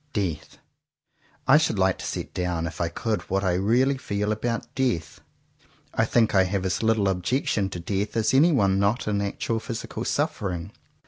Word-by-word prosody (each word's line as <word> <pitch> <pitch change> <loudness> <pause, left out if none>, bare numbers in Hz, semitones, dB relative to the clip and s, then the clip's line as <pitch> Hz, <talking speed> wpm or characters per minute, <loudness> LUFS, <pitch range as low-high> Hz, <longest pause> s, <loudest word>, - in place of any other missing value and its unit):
Death! 85 -7 -3 0.9
I 135 +3 +8
should 155 -9 0
like 95 -1 +2
to - - -6
set - - -5
down, 90 -2 -1
if 80 0 -5
I 85 - +1
could 110 +5 -2
what 95 +1 0
I 95 -2 +2
really 120 +9 +2
feel 105 -2 -2
about 115 +2 -3
death. 100 -12 -1 0.7
I - - +2
think 115 -2 +2
I 95 -2 +5
have 95 0 -2
as 95 - -1
little 110 -3 +2
objection 95 +2 0
to 90 - -6
death 100 +5 -2
as 110 +2 +2
anyone 130 - +4
not 105 +5 +1
in 100 -1 +1
actual 105 +3 -2
physical 115 0 -5
suffering. 90 -1 -2
100 Hz, 175 wpm, -25 LUFS, 95-115 Hz, 0.9 s, I